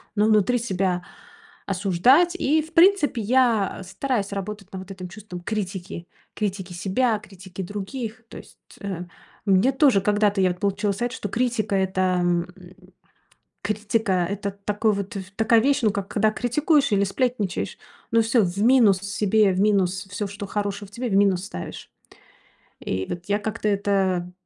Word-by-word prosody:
но 210 Hz, 0 st, +3 dB
внутри 215 Hz, +3 st, +3 dB
себя, 190 Hz, -5 st, -1 dB, 0.6 s
осуждать. 200 Hz, -, +3 dB
И, 310 Hz, +3 st, +2 dB
в 320 Hz, +2 st, -11 dB
принципе, 335 Hz, -, +4 dB
я 230 Hz, -4 st, +2 dB
стараюсь 205 Hz, +2 st, -2 dB
работать 200 Hz, 0 st, -6 dB
на 190 Hz, -, -5 dB
вот 190 Hz, +1 st, -10 dB
этим 185 Hz, -2 st, -8 dB
чувством 190 Hz, -3 st, -9 dB
критики. 190 Hz, -3 st, -5 dB, 0.3 s
Критики 195 Hz, -3 st, -3 dB
себя, 210 Hz, +5 st, 0 dB
критики 190 Hz, -2 st, -10 dB
других. 215 Hz, +4 st, -6 dB
То -, -, -10 dB
есть, -, -, -14 dB, 0.2 s
э, 195 Hz, -4 st, -4 dB, 0.4 s
мне 195 Hz, +7 st, +4 dB
тоже 265 Hz, -7 st, +4 dB
когда-то 205 Hz, 0 st, +2 dB
вот 185 Hz, -, +4 dB
я 180 Hz, -, 0 dB
получила 200 Hz, +1 st, -1 dB
совет, 240 Hz, +4 st, -2 dB
что 235 Hz, -, -4 dB
критика 230 Hz, -3 st, 0 dB
это, 185 Hz, -1 st, +1 dB
м, 175 Hz, 0 st, +1 dB, 1.1 s
критика 210 Hz, -3 st, 0 dB
это 200 Hz, 0 st, -3 dB
такой 210 Hz, +1 st, +1 dB
вот 200 Hz, +2 st, -4 dB
в 190 Hz, -1 st, -7 dB
такая 225 Hz, +1 st, +4 dB
вещь, 280 Hz, +1 st, +2 dB
ну 215 Hz, -, +4 dB
как 200 Hz, -1 st, -4 dB
когда 215 Hz, 0 st, +2 dB
критикуешь 275 Hz, +4 st, +1 dB
или 200 Hz, -, +3 dB
сплетничаешь, 215 Hz, -3 st, -2 dB, 0.3 s
ну 230 Hz, 0 st, +4 dB
всё 225 Hz, 0 st, +3 dB
в 180 Hz, +1 st, -3 dB
минус 230 Hz, -6 st, +5 dB
себе, 200 Hz, +1 st, +2 dB
в 185 Hz, -, -2 dB
минус 190 Hz, -2 st, +1 dB
всё, 205 Hz, 0 st, -3 dB
что 200 Hz, 0 st, -7 dB
хорошего 205 Hz, 0 st, -3 dB
в -, -, -21 dB
тебе, 240 Hz, +3 st, -4 dB
в 195 Hz, -, 0 dB
минус 195 Hz, -2 st, +3 dB
ставишь. 85 Hz, -, -8 dB, 0.9 s
И, 95 Hz, 0 st, -3 dB
вот, 175 Hz, 0 st, -5 dB
я 205 Hz, +1 st, +1 dB
как-то 215 Hz, 0 st, -3 dB
это 195 Hz, -3 st, 0 dB
205 Hz, 160 wpm, -24 LUFS, 190-225 Hz, 1.1 s, минус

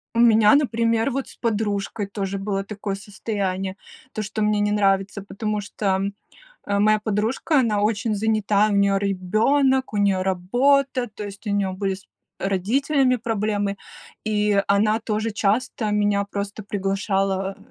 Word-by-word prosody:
У -, -, +1 dB
меня, 225 Hz, 0 st, +6 dB
например, 230 Hz, -2 st, +1 dB
вот, 270 Hz, +1 st, -3 dB
с -, -, -13 dB
подружкой 205 Hz, -2 st, -2 dB
тоже 195 Hz, -1 st, -3 dB
было 195 Hz, 0 st, -2 dB
такое 200 Hz, 0 st, -5 dB
состояние, 195 Hz, -2 st, -3 dB, 0.4 s
то 215 Hz, -, -3 dB
что 215 Hz, +1 st, -4 dB
мне 210 Hz, 0 st, +2 dB
не 205 Hz, -, +1 dB
нравится, 195 Hz, -1 st, +1 dB
потому 210 Hz, +2 st, -3 dB
что, 195 Hz, -1 st, -1 dB, 0.7 s
э, 200 Hz, 0 st, +1 dB
моя 215 Hz, +1 st, +4 dB
подружка, 220 Hz, +8 st, +1 dB
она 215 Hz, -5 st, +1 dB
очень 215 Hz, +1 st, 0 dB
занята, 215 Hz, -1 st, +2 dB
у 205 Hz, -, 0 dB
неё 200 Hz, 0 st, +3 dB
ребенок, 220 Hz, +8 st, +1 dB
у -, -, -1 dB
неё 195 Hz, -2 st, +2 dB
работа, 245 Hz, +8 st, +2 dB
то 210 Hz, -, -6 dB
есть 200 Hz, +2 st, -10 dB
у -, -, 0 dB
неё 200 Hz, -2 st, 0 dB
были 195 Hz, 0 st, -2 dB
с 195 Hz, -, -16 dB, 0.3 s
родителями 255 Hz, +8 st, +1 dB
проблемы, 210 Hz, -3 st, -1 dB, 0.5 s
и 210 Hz, -2 st, +1 dB
она 215 Hz, +2 st, +3 dB
тоже 220 Hz, 0 st, -2 dB
часто 215 Hz, +1 st, 0 dB
меня 205 Hz, -1 st, +2 dB
просто 200 Hz, +1 st, -4 dB
приглашала, 195 Hz, -1 st, -1 dB
205 Hz, 150 wpm, -23 LUFS, 195-220 Hz, 0.7 s, меня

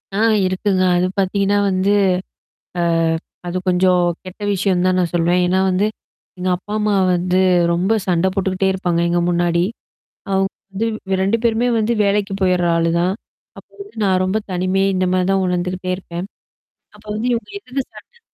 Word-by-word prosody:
ஆ -, -, -1 dB, 0.3 s
இருக்குங்க. 185 Hz, 0 st, 0 dB
அது 180 Hz, +1 st, +2 dB
பாத்தீங்கன்னா 200 Hz, +1 st, +1 dB
வந்து, 190 Hz, +2 st, +1 dB, 1.3 s
அ 180 Hz, -, -19 dB
அது 185 Hz, +1 st, -2 dB
கொஞ்சம் 180 Hz, 0 st, +3 dB, 0.2 s
கெட்ட 185 Hz, +3 st, -10 dB
விஷயம்னு 185 Hz, -2 st, +1 dB
தான் 185 Hz, 0 st, +2 dB
நான் 175 Hz, -2 st, -1 dB
சொல்லவேன். 175 Hz, +1 st, +2 dB
ஏன்னா 185 Hz, +1 st, +2 dB
வந்து. 190 Hz, +3 st, +1 dB, 0.5 s
எங்க 185 Hz, +1 st, -2 dB
அப்பா, 205 Hz, +3 st, -10 dB
அம்மா 210 Hz, -1 st, +1 dB, 0.2 s
வந்து 180 Hz, +1 st, 0 dB, 0.4 s
ரொம்ப 185 Hz, +5 st, +1 dB
சண்ட 180 Hz, 0 st, +2 dB
போட்டுக்கிட்டே 190 Hz, -1 st, 0 dB
இருப்பாங்க 175 Hz, -3 st, -1 dB
எங்க 175 Hz, 0 st, +1 dB
முன்னாடி. 175 Hz, 0 st, +1 dB, 0.7 s
அவுங்க 195 Hz, 0 st, +1 dB, 0.2 s
வந்து 210 Hz, +4 st, -2 dB, 0.4 s
2மே 200 Hz, +4 st, +2 dB
பேருமே 235 Hz, +1 st, +2 dB
வந்து 225 Hz, +2 st, +1 dB
வேலைக்கு 200 Hz, 0 st, 0 dB
போயிடுற 180 Hz, -2 st, +2 dB
ஆளு 165 Hz, 0 st, +1 dB
தான். 180 Hz, +2 st, +1 dB, 0.4 s
அப்போ -, -, -15 dB
வந்து 405 Hz, -, -12 dB
நான் 185 Hz, -2 st, +2 dB
ரொம்ப 190 Hz, +3 st, 0 dB
தனிமை 185 Hz, +2 st, 0 dB
இந்த 185 Hz, 0 st, +1 dB
மாரி 185 Hz, -1 st, +1 dB
தான் 195 Hz, -1 st, +2 dB
உணர்ந்துக்கிட்டே 180 Hz, +1 st, -2 dB
இருப்பேன். 175 Hz, -1 st, -6 dB, 0.7 s
அப்ப 210 Hz, +1 st, -19 dB
வந்து 230 Hz, +3 st, -2 dB
இவங்க 230 Hz, -, -3 dB
எதுல 270 Hz, -7 st, -5 dB
சண்டை 475 Hz, -1 st, -16 dB
185 Hz, 160 wpm, -19 LUFS, 180-200 Hz, 1.3 s, கொஞ்சம்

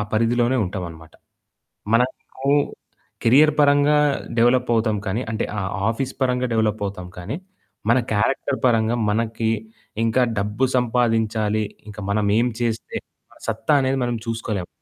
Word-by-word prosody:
పరిధిలోనే 120 Hz, +3 st, +2 dB
ఉంటామన్నమాట. 85 Hz, -4 st, -7 dB, 0.8 s
మనకు 130 Hz, +2 st, -1 dB, 0.8 s
కేరియర్ 145 Hz, +6 st, +6 dB
పరంగా 145 Hz, +1 st, +5 dB, 0.4 s
డెవలపవుతాం 120 Hz, -2 st, +3 dB
కానీ 105 Hz, +6 st, -1 dB
అంటే 110 Hz, -, -1 dB
ఆహ్, 95 Hz, -1 st, -2 dB, 0.2 s
ఆఫీసు 125 Hz, +3 st, -3 dB
పరంగా 125 Hz, 0 st, +1 dB
డెవలపవుతాం. 105 Hz, -4 st, -1 dB
కానీ 95 Hz, +10 st, -4 dB, 0.5 s
మన 120 Hz, -, +5 dB
క్యారెక్టర్ 130 Hz, +5 st, 0 dB
పరంగా 115 Hz, -1 st, +2 dB
మనకి 115 Hz, +1 st, 0 dB, 0.5 s
ఇంకా 115 Hz, +3 st, +2 dB, 0.2 s
డబ్బు 105 Hz, +5 st, 0 dB
సంపాదించాలి. 115 Hz, -3 st, +1 dB, 0.2 s
ఇంకా 105 Hz, 0 st, -8 dB
మనమేం 105 Hz, +3 st, +2 dB
చేస్తే 115 Hz, -2 st, -2 dB, 0.3 s
మన -, -, -20 dB
సత్తా 150 Hz, -, +1 dB
అనేది 135 Hz, 0 st, +1 dB
మనం 120 Hz, -1 st, -1 dB
చూసుకోలేం. 110 Hz, -5 st, -3 dB
115 Hz, 115 wpm, -22 LUFS, 105-125 Hz, 0.8 s, కేరియర్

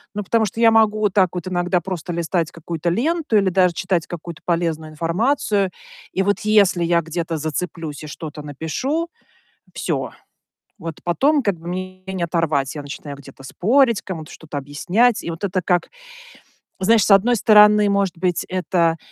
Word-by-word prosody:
Ну, 210 Hz, -, -2 dB
потому 225 Hz, +2 st, +2 dB
что 215 Hz, +3 st, -6 dB
я 230 Hz, -1 st, +6 dB
могу 215 Hz, -1 st, +3 dB
вот 205 Hz, -3 st, +1 dB
так 190 Hz, -3 st, +4 dB
вот 180 Hz, -1 st, -5 dB
иногда 180 Hz, 0 st, 0 dB
просто 180 Hz, -2 st, -5 dB
листать 170 Hz, 0 st, -1 dB
какую-то 165 Hz, +1 st, -4 dB
ленту 295 Hz, -, 0 dB
или 195 Hz, -2 st, +3 dB
даже 180 Hz, -1 st, +3 dB
читать 185 Hz, -2 st, -1 dB
какую-то 170 Hz, +1 st, -8 dB
полезную 165 Hz, -2 st, -1 dB
информацию. 195 Hz, -, 0 dB, 0.4 s
И 190 Hz, -, +1 dB
вот 205 Hz, +1 st, +1 dB
если 200 Hz, -4 st, +3 dB
я 170 Hz, 0 st, +2 dB
где-то 165 Hz, 0 st, -3 dB
зацеплюсь 155 Hz, -1 st, -4 dB
и -, -, -7 dB
что-то 150 Hz, 0 st, -8 dB
напишу- 205 Hz, -, -3 dB, 0.7 s
всё, -, -, -2 dB, 0.7 s
вот 165 Hz, -2 st, -6 dB
потом 275 Hz, -, +2 dB
как 200 Hz, -5 st, 0 dB
бы 170 Hz, -, -11 dB
меня 185 Hz, +1 st, -6 dB
не 180 Hz, -2 st, -2 dB
оторвать. 160 Hz, -5 st, 0 dB
Я 150 Hz, -, -4 dB
начинаю 145 Hz, 0 st, -8 dB
где-то 135 Hz, -1 st, -14 dB
спорить, 235 Hz, -, +2 dB
кому-то 160 Hz, -5 st, -7 dB
что-то 150 Hz, -2 st, -8 dB
объяснять. 180 Hz, -, +1 dB
И -, -, -4 dB
вот 165 Hz, +4 st, -9 dB
это 190 Hz, -1 st, 0 dB
как, 180 Hz, -2 st, +1 dB, 0.9 s
знаешь, 210 Hz, +2 st, +4 dB
с -, -, +1 dB
одной 220 Hz, +5 st, +5 dB
стороны, 210 Hz, -1 st, +6 dB
может 200 Hz, -3 st, 0 dB
быть, 180 Hz, 0 st, 0 dB
это 175 Hz, -3 st, +1 dB
180 Hz, 170 wpm, -21 LUFS, 165-205 Hz, 0.9 s, я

